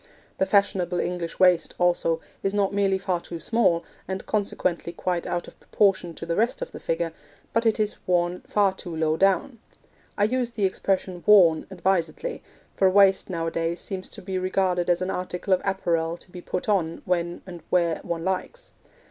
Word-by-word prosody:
The 190 - +2
fashionable 190 -3 +2
English 175 -2 -3
waist, 180 -2 +4
also, 175 -2 +1 0.2
is 195 +1 -1
not 200 -1 +1
merely 195 -1 +2
far 185 -2 -1
too 170 -1 -7
small, 180 -5 +2 0.2
and 190 +1 -4
consequently 185 -5 -1
quite 175 0 -2
out 175 - -2
of - - -14
proportion 190 -5 +1
to - - -7
the 170 0 -1
rest 230 - +1
of - - -5
the - - -8
figure, 165 0 -2 0.4
but 230 0 +2
it 220 - +2
is 210 -1 0
worn 175 0 +1
far 200 -2 +2
too 175 -3 -8
low 160 -1 +1
down. 195 +7 +1 0.6
I 205 - +2
use 245 +3 +1
the 215 -4 -1
expression 185 -1 -1
'worn' 180 -7 +6
advisedly, 190 - -1 0.3
for 190 - +4
a - - +3
waist 195 0 +4
nowadays 165 -1 -2
seems 190 -1 -5
to - - -10
be 185 0 -2
regarded 185 -1 0
as 175 +1 +2
an 185 - -2
article 180 +1 -2
of 185 - +2
apparel 170 -4 0
to 180 - -16
be 180 - -8
put 180 - -4
on 175 -6 0
when 175 -1 -1
and 175 -3 -9
where 170 -3 +2
one 165 -1 -4
likes. 190 - -3
185 Hz, 185 wpm, -25 LUFS, 170-195 Hz, 0.6 s, worn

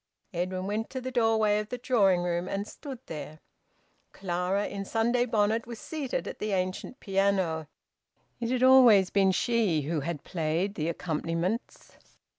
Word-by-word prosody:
Edwin 185 +2 -2
went 210 +3 -2
to 260 - -4
the 260 0 -5
doorway 220 -3 +3
of 210 0 -5
the 250 - -4
drawing 200 -8 +3
room 175 0 -1
and 200 +1 -3
stood 275 +1 -8
there. 150 -1 -7 0.8
Clara, 185 +2 -1
in 200 -1 -5
Sunday 235 +4 +1
bonnet, 225 0 +1
was 235 -1 -7
seated 290 +1 -4
at - - -7
the 210 -1 -2
ancient 185 +6 -3
piano; 190 -5 0 0.7
it 235 -1 -2
had 255 0 +1
always 245 -8 +7
been 195 -1 +4
she 200 -7 +1
who 155 +2 -1
had 150 0 -4
played 170 +3 -1
the 160 -3 -2
accompaniments. 170 - -3
200 Hz, 155 wpm, -28 LUFS, 175-230 Hz, 0.8 s, always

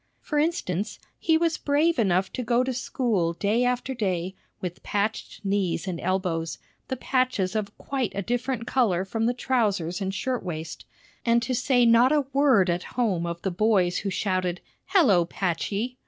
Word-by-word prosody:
For 300 - -1
instance, 215 - -1 0.2
he 320 -1 +3
was 330 0 0
brave 300 +1 +2
enough 190 -3 +1
to - - -3
go 240 +1 +2
to 260 0 -2
school 235 - 0
day 210 +7 +1
after 250 +1 0
day 190 -6 -2 0.3
with 180 -1 -5
patched 210 +1 -3
knees 195 -3 0
and 175 -3 -3
elbows, 175 -4 -1 0.3
the 260 - -2
patches 250 -7 0
of 210 -1 -3
quite 265 -6 -2
a 200 - -2
different 245 +1 -2
color 205 -9 +1
from 225 +3 -1
the 245 - +2
trousers 205 -9 0
and 190 0 -1
shirt 250 +6 -2
waist, 160 -3 -6 0.4
and 235 0 +4
to 255 +3 -1
say 245 0 +3
not 235 +3 +6
a 295 -2 +2
word 270 -9 +4
at 175 0 0 0.2
home 190 -9 +1
of 170 0 -5
the 190 - 0
boys 185 -2 +2
who 200 - -3
shouted, 185 -2 -1 0.3
"Hello, 285 - +5
Patchey!" 200 +8 -2
215 Hz, 170 wpm, -26 LUFS, 185-255 Hz, 0.4 s, not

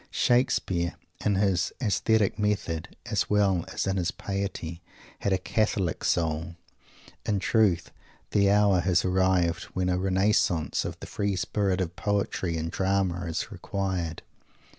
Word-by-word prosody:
Shakespeare, 95 -8 +1 0.3
in 105 -1 +2
his 95 -2 +1
aesthetic 110 -2 +1
method, 100 -6 -1
as - - -1
well 100 -4 +2
as - - -2
in 95 0 0
his 90 -2 0
piety, 95 -4 -4 0.4
had 100 - -1
a 95 - +3
Catholic 95 -2 0
soul. 85 0 0 0.7
In 105 - 0
truth, 100 -3 +2 0.4
the 100 -1 +4
hour 100 -2 +4
has 90 0 +2
arrived 90 -2 +2
when 90 -1 +1
a 90 0 +1
"Renaissance" 95 -3 +1
of - - -5
the - - -6
free 100 -1 -1
spirit 95 +1 0
of 90 -1 -3
Poetry 100 -4 -1
in 80 +1 -2
Drama 95 -1 0
is 80 - -3
required. 95 -5 -3
95 Hz, 140 wpm, -27 LUFS, 85-100 Hz, 0.7 s, the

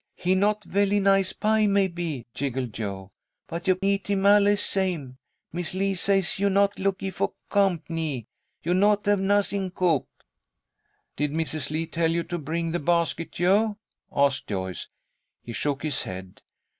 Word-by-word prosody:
"He 180 +1 +1
not 210 +2 +2
velly 200 +1 +2
nice 195 -1 +3
pie, 215 0 +2
maybe," 175 - 0
giggled 130 -4 -3
Jo. 100 -3 -5 0.4
"But 170 +2 -5
you 185 -1 +4
eat 200 0 +1
him 200 -1 +1
allee 205 0 +6
same. 175 -11 -1 0.3
Mis' 175 0 -3
Lee 195 +1 +1
say 195 +1 +2
you 200 +1 +2
not 200 +1 +2
lookee 195 0 -1
for - - -2 0.2
comp'nee. 165 - 0 0.4
You 175 - +1
not 205 +2 +3
have 205 -1 +3
nuzzing 200 0 +1
cook." 170 -7 +2 1.1
"Did 150 0 -1
Mrs. 155 -3 -2
Lee 155 +2 -1
tell 165 0 0
you 170 +1 0
to 175 +1 -4
bring 165 +2 -2
the 175 - -1
basket, 170 +1 0
Jo?" 205 +4 +2 0.3
asked 140 -2 +1
Joyce. 95 -3 -4 0.6
He 120 - -7
shook 145 +3 -2
his 150 -4 0
head. 95 0 -8
175 Hz, 155 wpm, -26 LUFS, 150-200 Hz, 1.1 s, allee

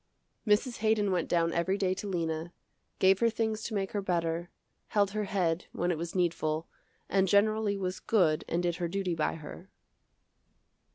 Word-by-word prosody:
Mrs. 225 +4 +2
Haydon 215 -2 +2
went 175 -3 0
down 165 -1 +2
every 185 +3 +1
day 190 -2 +1
to 200 +2 -5
Lena, 165 -2 -2 0.4
gave 190 0 +4
her 235 - +4
things 220 -1 -1
to 220 - -3
make 195 -1 -1
her 205 - -1
better, 170 -2 -1 0.4
held 200 -2 +2
her 210 0 -2
head 180 -4 0
when 175 +1 0
it 170 - -1
was 170 +1 -5
needful, 165 -3 0 0.4
and 195 0 +2
generally 205 +1 +3
was 185 -1 -3
good 170 -9 +2
and 170 +2 0
did 175 -1 0
her 175 -1 -1
duty 190 0 -1
by 160 -2 0
her. 165 +4 -10
185 Hz, 175 wpm, -30 LUFS, 170-205 Hz, 0.4 s, gave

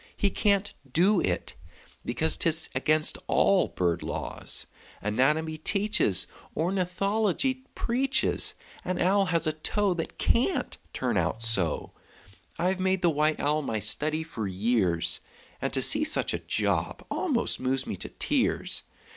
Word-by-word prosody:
He 200 - +1
can't 200 0 +1 0.2
do 185 +7 +3
it, 90 -2 -2 0.5
because 80 -1 +2
'Tis 160 - +2
against 155 +4 +3
all 195 -2 +3
bird 85 -2 -1
laws - - -2 0.3
Anatomy 150 +9 0
teaches, 200 - +2 0.3
Ornithology 195 - -1
preaches 265 +3 0 0.3
An 185 -1 -3
owl 195 +2 +2
has 170 -3 +1
a 155 - 0
toe 195 +5 0
That 165 -2 -6
can't 255 +3 0 0.2
turn 120 -5 -2
out 90 +6 -1
so! 95 -9 +2 0.7
I've 185 +2 0
made 190 0 0
the 170 - +4
white 155 +1 +1
owl 150 +2 0
my 115 -6 -3
study 150 +10 +2
for 120 -10 -5
years, 95 -3 0 0.4
And - - -2
to 130 -1 +3
see 300 +1 +6
such 310 0 +2
a - - -2
job - - -2
almost 285 -11 0
moves 130 +1 -1
me - - -4
to - - -2
tears! - - -1
160 Hz, 140 wpm, -27 LUFS, 125-200 Hz, 0.7 s, see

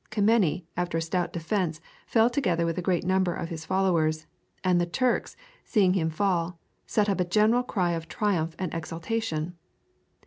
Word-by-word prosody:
Kemeny, 205 -6 +2
after 175 -1 -1
a - - 0
stout 175 +1 -1
defence, 170 -1 -1 0.3
fell 225 -1 +4
together 185 -10 +1
with 165 -1 -1
a - - -2
great 180 -1 +1
number 185 -1 +1
of 165 - -4
his 160 -1 -6
followers, 165 -5 +1 0.4
and 180 -2 +3
the 175 - 0
Turks, 250 +7 0 0.3
seeing 195 -5 +3
him 165 -4 +1
fall, 175 -1 0 0.3
set 210 -1 +2
up 195 -2 0
a - - +4
general 215 +7 +3
cry 185 -8 0
of 165 -1 -3
triumph 170 -5 -1
and 185 -3 -3
exultation. 165 0 -3
180 Hz, 170 wpm, -27 LUFS, 165-205 Hz, 0.4 s, fell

